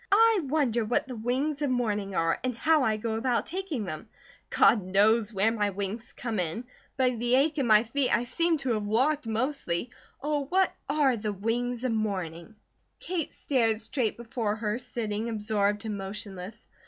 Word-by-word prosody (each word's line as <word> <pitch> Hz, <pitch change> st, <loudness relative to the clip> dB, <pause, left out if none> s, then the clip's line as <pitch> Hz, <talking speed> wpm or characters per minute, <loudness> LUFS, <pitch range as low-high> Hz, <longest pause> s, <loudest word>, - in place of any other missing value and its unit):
I 450 Hz, +1 st, +6 dB
wonder 260 Hz, -5 st, +1 dB
what 240 Hz, +5 st, 0 dB
the 255 Hz, -, -6 dB
wings 265 Hz, +6 st, -1 dB
of 290 Hz, -, +1 dB
morning 210 Hz, -6 st, -1 dB
are, 165 Hz, 0 st, +1 dB
and 250 Hz, -2 st, -2 dB
how 315 Hz, +3 st, +3 dB
I 220 Hz, -3 st, +1 dB
go 220 Hz, 0 st, -2 dB
about 240 Hz, +1 st, 0 dB
taking 355 Hz, -, -3 dB
them. 175 Hz, +5 st, -7 dB, 0.4 s
God 220 Hz, -, +5 dB
knows 210 Hz, +4 st, +3 dB
where 210 Hz, +2 st, +2 dB
my 210 Hz, -3 st, 0 dB
wings 200 Hz, +4 st, -4 dB
come 225 Hz, -4 st, -3 dB
in; 180 Hz, +7 st, -2 dB, 0.3 s
by 255 Hz, -2 st, +3 dB
the 240 Hz, +1 st, +1 dB
ache 295 Hz, +3 st, +2 dB
in 265 Hz, -, +1 dB
my 215 Hz, -1 st, +6 dB
feet 255 Hz, +3 st, 0 dB
I 235 Hz, -, +2 dB
seem 335 Hz, +6 st, +1 dB
to 255 Hz, -, +1 dB
have 215 Hz, -, -1 dB
walked, 255 Hz, +6 st, +1 dB
mostly. 225 Hz, -4 st, -2 dB, 0.3 s
Oh, 295 Hz, -1 st, -1 dB
what 375 Hz, +5 st, +2 dB, 0.2 s
ARE 280 Hz, -4 st, +3 dB
the 210 Hz, 0 st, -2 dB
wings 235 Hz, +4 st, -2 dB
of 255 Hz, -, 0 dB
morning?" 195 Hz, -3 st, -3 dB, 0.4 s
Kate 345 Hz, -4 st, -3 dB
stared 225 Hz, -6 st, +1 dB
straight 225 Hz, 0 st, -1 dB
before 230 Hz, -3 st, -2 dB
her, 220 Hz, +1 st, -2 dB
sitting 225 Hz, -2 st, -3 dB
absorbed 210 Hz, -1 st, 0 dB
and 210 Hz, -2 st, -3 dB
motionless. 195 Hz, +1 st, -6 dB
230 Hz, 180 wpm, -28 LUFS, 210-265 Hz, 0.4 s, I